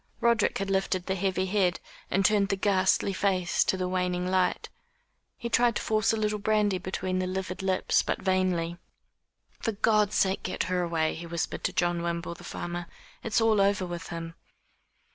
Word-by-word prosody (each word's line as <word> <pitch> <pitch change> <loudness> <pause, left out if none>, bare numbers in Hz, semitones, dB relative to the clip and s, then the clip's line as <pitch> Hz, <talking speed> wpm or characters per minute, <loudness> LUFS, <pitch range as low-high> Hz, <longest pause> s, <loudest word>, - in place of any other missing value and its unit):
Roderick 235 -2 +2
had 195 0 -2
lifted 190 -1 0
the 190 - -1
heavy 190 0 0
head, 185 -2 +1 0.3
and 195 +1 +1
turned 205 -1 +3
the 195 - +2
ghastly 195 0 +2
face 185 -3 +1
to 190 - +1
the 185 0 -1
waning 180 -1 -1
light. 185 0 +1 0.7
He 235 - -4
tried 235 -1 +3
to - - -1
force 215 0 +2
a 225 - 0
little 210 -1 0
brandy 205 -2 +1
between 185 0 -2
the 185 - -1
livid 185 0 -4
lips 190 -1 +2
but - - -2
vainly. 185 -3 0 0.8
"For 225 - -1
God's 210 0 +2
sake 190 0 +2
get 185 - -2
her 180 0 0
away," 165 -2 0
he 170 +1 -7
whispered 170 0 -3
to - - +1
John 175 -1 +1
Wimble, 170 0 -3
the - - -13
farmer. 175 0 -5 0.3
"It's 225 0 +1
all 220 -2 +4
over 195 -1 +2
with 175 -1 -6
him." 165 0 -6
185 Hz, 180 wpm, -28 LUFS, 180-200 Hz, 0.8 s, all